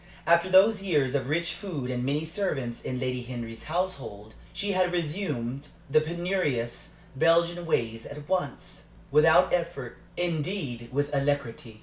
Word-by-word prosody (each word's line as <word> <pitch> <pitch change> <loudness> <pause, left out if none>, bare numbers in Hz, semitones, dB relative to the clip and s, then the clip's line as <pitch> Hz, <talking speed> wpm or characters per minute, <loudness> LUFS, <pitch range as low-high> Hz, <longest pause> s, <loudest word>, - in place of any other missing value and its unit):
After 170 +2 +4
those 195 +3 +6
years 150 -9 +1
of 135 -2 -1
rich 170 +2 +1
food 170 -9 -4
and 125 -1 -2
many 145 +4 0
servants 155 - -2
in 125 - -3
Lady 125 -1 -1
Henry's 120 -2 -7
household, 145 - -3 0.2
she 205 0 -2
had 185 -2 +2
resumed 150 -7 -2 0.2
the 155 +1 +6
penurious 160 -8 -1 0.2
Belgian 170 +3 +3
ways 115 -6 0
at 145 0 -9
once, 180 -7 -3 0.3
without 160 +4 +6
effort 165 -7 -2 0.2
indeed, 155 - -2
with 145 +2 -1
alacrity. 135 -5 -1
150 Hz, 135 wpm, -28 LUFS, 125-175 Hz, 0.3 s, those